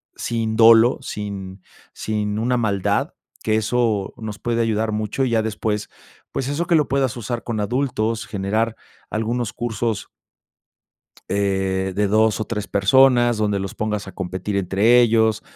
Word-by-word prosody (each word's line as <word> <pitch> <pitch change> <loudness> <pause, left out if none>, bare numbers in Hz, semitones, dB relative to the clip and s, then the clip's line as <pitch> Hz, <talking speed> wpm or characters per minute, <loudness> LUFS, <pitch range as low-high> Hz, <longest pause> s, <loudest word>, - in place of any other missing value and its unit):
sin 115 -2 -2
dolo, 115 +1 +7
sin 100 -2 -6 0.3
sin 105 -1 -2
una 125 +2 +1
maldad, 100 -5 0 0.3
que 110 -1 +1
eso 110 -2 0
nos 110 -3 -6
puede 115 -1 -1
ayudar 110 -1 0
mucho 110 +5 -2
y 125 - -1
ya 110 -1 +3
después, 105 -1 -2 0.4
pues, 135 - -3
eso 160 +4 -2
que 170 - +3
lo 150 -3 +3
puedas 135 -2 0
usar 120 +1 -4
con 115 -3 -3
adultos, 115 -1 -1
generar 110 +3 -1 0.4
algunos 110 0 -2
cursos. 115 -2 -3 1.2
Eh, 95 -1 0
de 105 0 +1
2 110 +1 +2
o - - +1
3 105 -2 -4
personas 120 +3 +4
donde 105 -2 0
los 95 0 -4
pongas 105 -2 -3
a - - -7
competir 95 +2 -4
entre 100 +6 +4
ellos, 110 -2 +3
110 Hz, 150 wpm, -21 LUFS, 100-120 Hz, 1.2 s, dolo